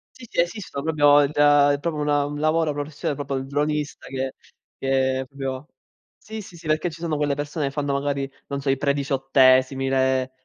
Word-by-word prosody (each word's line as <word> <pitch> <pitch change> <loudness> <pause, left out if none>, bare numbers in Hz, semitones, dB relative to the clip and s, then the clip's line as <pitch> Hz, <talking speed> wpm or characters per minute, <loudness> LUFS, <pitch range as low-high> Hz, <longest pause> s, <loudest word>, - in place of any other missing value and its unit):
Sì, 240 -2 -12
sì, - - -3
esistono 175 -6 -4
proprio 145 -2 +5
il 145 +1 +1
da 145 -1 +5
è 140 - 0
proprio 155 -1 -2
una 145 -1 +1
un 145 0 -5
lavoro 155 0 +1
professione 145 0 -3
proprio 140 -1 -4
il 130 - -4
dronista 150 +1 -2
che 135 0 -3 0.4
che 130 0 0
proprio 135 +1 -5 0.5
sì, 220 0 -8
sì, 180 - -13
sì, 165 -1 -11
perché 155 +3 +1
ci 165 +1 -12
sono 160 -3 -1
quelle 145 -1 +1
persone 145 +1 -3
e - - -4
fanno 145 -1 -2
magari, 140 -1 -2 0.2
non 140 -1 -4
so, 135 - -2
i 135 - +2
prediciottesimi, 135 -1 +2
le 130 -1 +1
145 Hz, 195 wpm, -23 LUFS, 135-150 Hz, 0.5 s, proprio